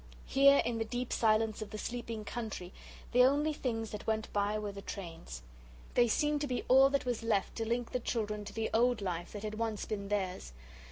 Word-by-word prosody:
Here 275 +1 +6
in 235 -1 -1
the - - +1
deep 245 +2 -3
silence 220 -1 +2
of 215 - -5
the 215 - -6
sleeping 230 -1 -5
country 215 -6 -5 0.4
the 250 +1 +6
only 290 +4 +3
things 225 -6 -3
that 210 - -7
went 220 -1 -1
by 205 +1 +1
were 210 -1 -3
the 200 0 -8
trains. 165 - -7 0.5
They 240 - +5
seemed 295 +5 +1
to 290 - -1
be 250 -2 -2
all 265 +2 +7
that 280 -1 0
was 245 -3 -1
left 215 -4 0
to 225 -1 -2
link 235 +1 -1
the 250 - 0
children 210 -3 -2
to - - -7
the 225 0 -2
old 240 +1 +3
life 175 -2 -3
that 205 0 -6
had 215 0 -4
once 225 -2 -2
been 200 -2 -4
theirs. 190 - -2
225 Hz, 215 wpm, -33 LUFS, 210-245 Hz, 0.5 s, all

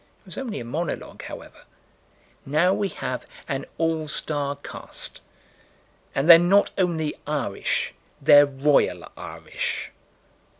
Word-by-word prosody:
It - - -34
was - - -10
only 245 -5 -4
a 120 - -6
monologue, 155 +7 -4
however: - - -10 0.8
now 155 +7 +3
we 200 - 0
have 130 -6 -5 0.2
an 135 -1 -3
all 160 -1 0
star 145 -2 0
cast: 140 - -5 0.9
and 135 +3 +1
they're 170 -1 +11
not 195 +4 +4
only 165 -5 -1
Irish; 145 -10 -1 0.3
they're 145 0 +7
royal 140 +1 +2
Irish. - - -5
150 Hz, 120 wpm, -24 LUFS, 140-170 Hz, 0.9 s, they're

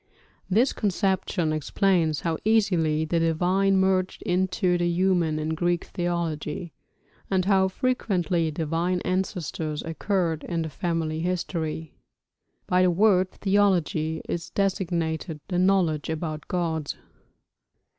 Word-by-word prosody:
This 230 +8 +3
conception 190 -5 0
explains 160 0 +1
how 165 -2 -1
easily 180 -8 +2
the 165 +1 0
divine 180 +4 +2
merged 190 -1 +1
into 180 0 +1
the 175 0 +1
human 175 -3 +2
in 155 0 -2
Greek 175 +2 0
theology, 170 -2 -3 0.6
and 185 -2 +1
how 190 -1 +4
frequently 185 -7 0
divine 165 +3 -1
ancestors 175 -4 -2
occurred 165 -1 -1
in 165 -2 -2
family 165 -1 -2
histories. 165 -3 -2 0.8
(By 180 0 +2
the 185 - +4
word 185 0 +3
'theology' 180 -6 +1
is 170 0 -3
designated 170 -4 -1
the 180 -2 0
knowledge 180 -6 +2
about 155 -1 -4
gods.) 160 -4 -2
175 Hz, 110 wpm, -25 LUFS, 160-190 Hz, 0.8 s, how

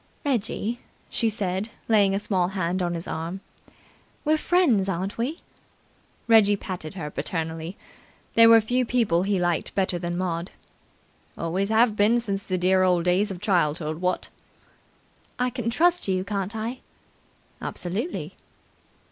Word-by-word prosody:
"Reggie," 235 -2 -1 0.3
she 230 - +1
said, 200 0 -2 0.2
laying 205 -3 +4
a - - 0
small 190 -4 0
hand 185 -1 -1
on 175 -1 -1
his 165 - -6
arm. 165 +4 -4 0.9
"We're 310 +1 +4
friends, 300 - +2
aren't 190 +2 -2
we?" 260 +8 -3 0.9
Reggie 215 -3 +6
patted 180 -5 -6
her 150 -5 -5
back - - -28
paternally. 165 +2 -4 0.6
There 230 0 +7
were 230 0 +9
few 245 +4 +1
people 225 -8 +2
he 195 +1 +1
liked 175 -2 -1
better 185 -2 0
than 175 0 -3
Maud. 175 0 -2 0.9
"Always 185 +5 -1
have 220 0 +4
been 215 +3 +4
since 200 -4 -2
the 185 -1 -2
dear 185 +1 +3
old 180 -2 +3
days 185 +4 +2
of 185 -2 -7
childhood, 160 -5 0
what!" 180 0 -1 1.1
"I 250 0 0
can 240 -2 -2
trust 345 +6 +2
you, 185 -1 +1
can't 200 +1 -3
I?" 230 +4 -4 0.8
"Absolutely!" 200 - -4
195 Hz, 145 wpm, -25 LUFS, 180-225 Hz, 1.1 s, were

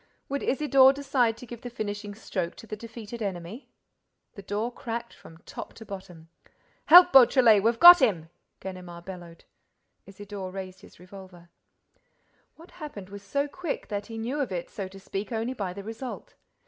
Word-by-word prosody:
Would 280 +1 -2
Isidore 270 -1 +4
decide 265 -5 0
to - - -11
give 240 -1 -10
the 245 - -7
finishing 205 -3 -5
stroke 185 -5 -4
to - - -12
the 215 - -6
defeated 230 +1 -9
enemy? 195 +4 -6 0.6
The 200 - -10
door 210 +5 -3
cracked 235 0 -6
from 160 - -15
top - - -9
to 225 - -12
bottom. 180 -5 -10 0.6
"Help, 355 +2 +9
Beautrelet, 245 -5 +7
we've 230 +2 +1
got 350 +2 +10
him!" 170 -10 +1 0.3
Ganimard 180 -2 -9
bellowed. 175 -3 -10 0.6
Isidore 195 -1 -8
raised 190 0 -8
his - - -17
revolver. 180 -2 -14 1.0
What 330 +2 -16
happened 205 -11 -8
was 200 0 -9
so 280 +9 -2
quick 350 +1 -5
that 205 -1 -4
he 225 -1 -8
knew 245 +6 -3
of 265 -7 -2
it, 175 -2 -5
so 195 -2 -5
to 195 +1 -13
speak, 195 +3 -6
only 230 +2 -2
by 200 -7 -4
the 200 +2 -8
result. 225 +4 -8
210 Hz, 170 wpm, -27 LUFS, 190-245 Hz, 1.0 s, got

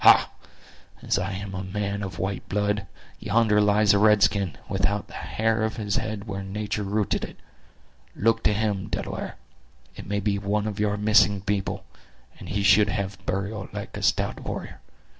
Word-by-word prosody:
Ha—as - - +1
I 95 +1 -2
am 100 +1 -5
a 95 +1 -4
man 100 +1 -3
of 95 -2 -5
white 95 +1 -3
blood, 105 0 0 0.3
yonder 105 -1 +3
lies 105 0 +4
a 100 - +4
red 105 -1 +5
skin, 95 -7 +1
without 100 +1 0
the - - -15
hair 110 0 0
of 110 0 0
his 105 -3 -1
head 110 -2 -3
where 100 -2 -4
nature 105 +2 -3
rooted 105 +1 0
it! - - -8 0.8
Look 115 +1 +2
to 105 - +4
him, 105 -2 -1
Delaware; - - -4 0.6
it - - -9
may 100 +1 0
be 100 0 0
one 105 +1 0
of 105 -1 -4
your 105 -1 +1
missing 105 -2 +4
people; 100 0 -2 0.5
and - - -9
he 100 -1 -1
should 100 +2 +6
have 100 -1 -3
burial 100 +1 -2
like - - -6
a - - -5
stout - - +1
warrior. - - -6
105 Hz, 175 wpm, -25 LUFS, 100-105 Hz, 0.8 s, should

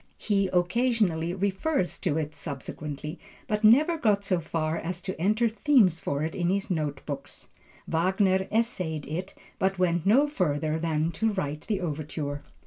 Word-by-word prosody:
He 200 -2 +1
occasionally 180 -3 +1
refers 195 - 0
to 160 -4 0
it 155 -1 -2
subsequently, 150 +1 -6 0.3
but 210 +1 -1
never 300 +10 +5
got 205 -6 +2
so 185 -3 +1
far 160 -1 -2
as 170 +1 -3
to 190 -1 -3
enter 215 +5 +3
themes 220 - +3
for 140 -1 -2
it 160 - -2
in 175 -1 0
his 195 +1 -1
note 150 -4 -2
books. - - -7 0.4
Wagner 190 +3 +2
essayed 185 -10 -1
it, 180 +5 -5 0.2
but 195 0 +1
went 175 -1 +1
no 270 +8 +5
further 160 - 0
than 160 0 0
to 220 +6 0
write 150 -6 -3
the 210 -4 -1
overture. 150 -3 -4
180 Hz, 155 wpm, -27 LUFS, 155-205 Hz, 0.4 s, never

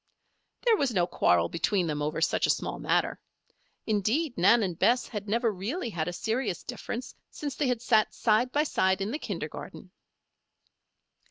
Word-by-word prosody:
There 465 -2 +6
was 280 - +1
no 180 -6 +2
quarrel 85 - +2
between 185 +2 0
them 150 -2 -2
over 155 +2 -2
such - - +2
a - - -4
small - - -1
matter. - - 0 0.7
Indeed, 225 - 0
Nan 205 +6 +5
and 180 -4 -3
Bess 245 +2 +3
had 210 -2 -6
never 230 +1 +2
really 225 - -4
had 160 -3 -2
a - - -1
serious 225 0 -2
difference 245 0 -6 0.2
since 290 -2 -5
they 290 - 0
had 245 -2 -1
sat 220 -3 +3
side 230 +3 +2
by 295 +2 +2
side 190 -10 +1
in 200 +3 -2
the 295 - -3
kindergarten. - - -7
220 Hz, 170 wpm, -28 LUFS, 185-250 Hz, 0.7 s, There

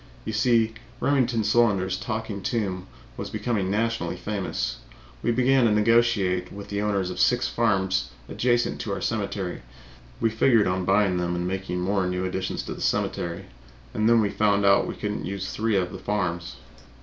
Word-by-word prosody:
You 110 - -3
see 115 0 +3 0.3
Remington 125 -5 +2
Solander's 105 -4 +2
Talking 110 -3 -4
Tomb 95 -5 -2 0.3
was - - -5
becoming 105 -3 -1
nationally 115 +3 -1
famous. 95 - -3 0.4
We - - 0
began 130 +1 +3
to 110 - +3
negotiate 105 -4 +2
with 100 0 -9
the 100 0 -2
owners 100 -3 0
of - - -6
six - - +3
farms 95 -9 +1 0.2
adjacent 120 -1 0
to 100 - -3
our - - -3
cemetery; 100 -4 -2 0.6
we 115 - +2
figured 110 0 +4
on 90 0 0
buying 95 -1 +3
them 90 0 -1
and 90 0 -2
making 95 -1 -3
more 95 0 +1
new 90 0 -2
additions 95 0 -3
to - - -5
the - - -10
cemetery. 85 -1 -1 0.5
And 110 +1 +2
then 115 -1 +5
we 100 -2 0
found 100 -1 +2 0.2
we - - -4
could 105 -1 -3
not - - -6
use 95 0 -4
three 110 0 0
of 90 -2 0
the - - -7
farms. 90 -5 -2
100 Hz, 175 wpm, -25 LUFS, 95-115 Hz, 0.6 s, then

